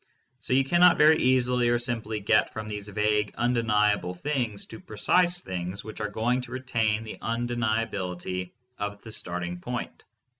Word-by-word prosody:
So 125 - -2
you 135 +1 +4
cannot 175 +5 +5
very 155 +1 +6
easily 125 -1 +3
or 120 - +3
simply 115 -3 -3
get 110 +2 +2
from 110 0 -5
these 105 -1 -5
vague 105 0 0
undeniable 105 -6 +1
things 120 -1 -2
to 110 - -10
precise 175 - +1
things 95 - -5
which 110 - -8
are 105 - -2
going 120 +5 0
to 125 - -10
retain 115 -4 0
the 110 - -8
undeniability 110 -6 -2 0.3
of 100 0 -4
the 110 - -9
starting 90 -3 -2
point. 120 +6 -5
110 Hz, 155 wpm, -27 LUFS, 105-125 Hz, 0.3 s, very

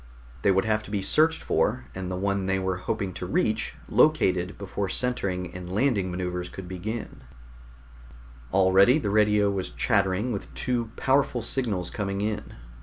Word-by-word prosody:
They - - +3
would 95 +1 +3
have 110 -1 +1
to 105 - -12
be 100 -2 -1
searched 160 +8 +3
for, 125 +5 0
and 95 -1 -5
the 90 - -3
one 100 0 -1
that - - +1
they - - +2
were 95 -1 -1
hoping 100 0 -3
to 90 - -5
reach 110 +3 0
located 100 - +2
before 100 0 -3
centering 95 -7 -1
and 90 -1 -7
landing 105 -3 +1
maneuvers 90 0 -3
could 95 -2 -9
be 90 0 -6
begun. 110 +4 -5 1.3
Already 95 - +5
the 105 -10 -1
radio 105 -1 +3
was 95 -2 -3
chattering 100 0 +1
with 100 - -5
two 120 -3 -1
powerful 135 -3 +1
signals 110 -8 -1
coming 100 -3 -3
in. 105 0 -3
100 Hz, 170 wpm, -26 LUFS, 95-110 Hz, 1.3 s, Already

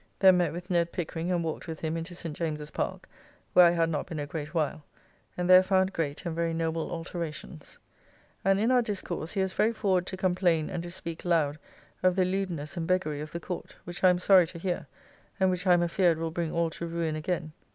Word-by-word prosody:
Then 190 -2 +6
met 175 -1 +1
with 180 +3 -7
Ned 170 -1 +2
Pickering, 170 0 -3
and 175 -2 +1
walked 160 +2 -4
with 160 -2 -6
him 160 0 -2
into 165 +2 -5
St. 165 -3 -5
James's 150 -2 -3
Park - - -3 0.5
(where 180 -1 +8
I - - +6
had 170 -1 +2
not 155 -3 -2
been 160 - -6
a 145 - -2
great 150 0 -5
while), 155 -1 -1 0.5
and 180 0 -1
there 185 0 +9
found 190 0 +2
great 155 +1 -3
and 170 - -2
very 165 0 0
noble 165 0 -1
alterations. 165 -2 -6 0.7
And, 195 +1 +3
in 225 +4 +2
our 250 -1 +5
discourse, 190 -7 -4
he 195 - 0
was 190 0 -2
very 225 +2 +2
forward 185 -4 +1
to 185 - -4
complain 175 -4 +1
and 175 - -3
to 175 - -7
speak 170 -2 -6
loud 155 -4 +1 0.4
of 185 -1 +3
the 185 -1 +3
lewdness 185 -4 -2
and 165 -2 -3
beggary 165 -5 0
of 150 0 -7
the 170 - -4
Court, 175 +1 -6
which 175 +1 -8
I 185 - +8
am 180 - +3
sorry 180 -1 +5
to 170 - -9
hear, 175 +1 -3 0.5
and 190 -1 +4
which 180 +1 -2
I 180 - +7
am 175 - +2
afeard 175 -1 +2
will 165 0 -3
bring 165 -1 -2
all 170 -1 0
to 170 - -5
ruin 165 -2 -2
again. 155 0 -3
170 Hz, 230 wpm, -28 LUFS, 160-185 Hz, 0.7 s, there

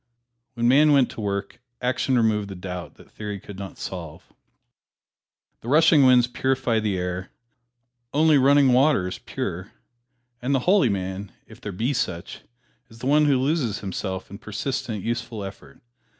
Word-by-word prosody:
When 120 -1 +1
man 145 +4 +5
went 135 -3 +4
to - - -7
work, 100 +3 -4 0.2
action 130 +1 0
removed 110 -3 +1
the 95 - -8
doubt 90 -1 -7
that - - -18
theory 105 -2 -6
could 100 0 -11
not 100 -1 -8
solve. 85 -5 -8 1.3
The - - -12
rushing 150 0 +5
winds 125 -1 +6
purify 125 -2 0
the 105 -3 -1
air; 90 +1 -4 0.8
only 155 0 +4
running 140 -1 +5
water 130 -7 +3
is 90 - -6
pure; - - -5 0.7
and 135 +3 0
the 130 - +1
holy 185 - +4
man, 95 0 -4
if - - -16
there 105 - -5
be 115 +9 -1
such, 90 -9 -3 0.5
is 110 - -15
the 115 - -8
one 150 +2 +4
who 140 -3 +3
loses 130 -5 0
himself 95 -1 -5
in 100 - -9
persistent, 110 -1 -4
useful 115 -2 -3
effort. 75 -8 -10
115 Hz, 160 wpm, -24 LUFS, 100-135 Hz, 1.3 s, winds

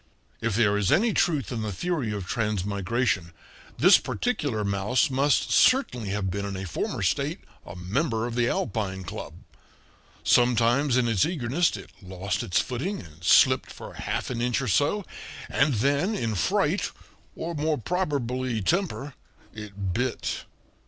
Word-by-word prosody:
If 115 -3 0
there 105 -2 +3
is 100 -2 +1
any 220 +2 +3
truth 145 - +1
in 115 - -3
the 110 -1 -3
theory 140 - -2
of 100 -3 -4
transmigration, 100 -2 -1 0.4
this - - +7
particular 145 - -2
mouse 100 +9 +1
must 140 +1 +2
certainly 230 - +3
have 95 -1 -1
been 100 +2 -3
in 100 -1 -4
a 95 - -5
former 85 - -3
state - - 0 0.3
a 85 - -8
member 110 - -1
of 120 - -4
the 120 0 +1
Alpine 95 -5 -2
Club. 90 - -7 0.9
Sometimes 120 +3 +3
in 125 -2 +2
its 105 -5 +2
eagerness 165 +1 0
it - - -11
lost 95 0 -3
its 90 - +1
footing 150 +12 -3
and 85 -1 -14
slipped - - +5
for - - -10
half - - -3
an 120 -2 -3
inch 125 0 +1
or 135 - -3
so; 145 - +1 0.4
and 145 -2 +2
then, 140 - +1
in 115 - -1
fright, 90 - +1 0.5
or 170 +1 -4
more 155 0 0
probably 130 -6 -1
temper, 160 - -1 0.4
it 100 -3 -5
bit. 125 +4 -2
120 Hz, 150 wpm, -26 LUFS, 100-145 Hz, 0.9 s, this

